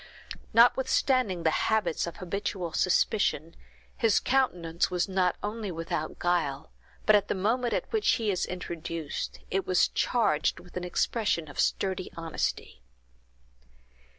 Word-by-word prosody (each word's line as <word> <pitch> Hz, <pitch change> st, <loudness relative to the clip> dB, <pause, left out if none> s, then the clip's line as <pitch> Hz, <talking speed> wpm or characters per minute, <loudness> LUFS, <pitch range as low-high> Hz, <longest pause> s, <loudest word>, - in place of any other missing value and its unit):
Notwithstanding 245 Hz, -5 st, +3 dB
the 160 Hz, -, +3 dB
symptoms 185 Hz, -4 st, 0 dB
of 170 Hz, -, -7 dB
habitual 185 Hz, -2 st, -3 dB
suspicion, 175 Hz, -4 st, +1 dB, 0.4 s
his 225 Hz, -3 st, +3 dB
countenance 175 Hz, -11 st, +1 dB
was 180 Hz, +1 st, 0 dB
not 185 Hz, -2 st, +1 dB
only 210 Hz, 0 st, -3 dB
without 160 Hz, -2 st, -4 dB
guile, 170 Hz, -6 st, -1 dB, 0.3 s
but 215 Hz, -, +6 dB
at 205 Hz, -1 st, +2 dB
the -, -, -1 dB
moment 230 Hz, +5 st, 0 dB
at -, -, -4 dB
which 435 Hz, -1 st, +3 dB
he 220 Hz, -3 st, 0 dB
is 185 Hz, -, -1 dB
introduced, 165 Hz, -3 st, -5 dB
it 195 Hz, 0 st, -1 dB
was 185 Hz, -1 st, +3 dB
charged 185 Hz, -11 st, +1 dB
with 180 Hz, -, -16 dB
an 180 Hz, -, -3 dB
expression 180 Hz, -2 st, 0 dB
of 145 Hz, -, -10 dB
sturdy 190 Hz, -1 st, 0 dB
honesty. 165 Hz, -, -3 dB
185 Hz, 130 wpm, -28 LUFS, 170-220 Hz, 0.4 s, but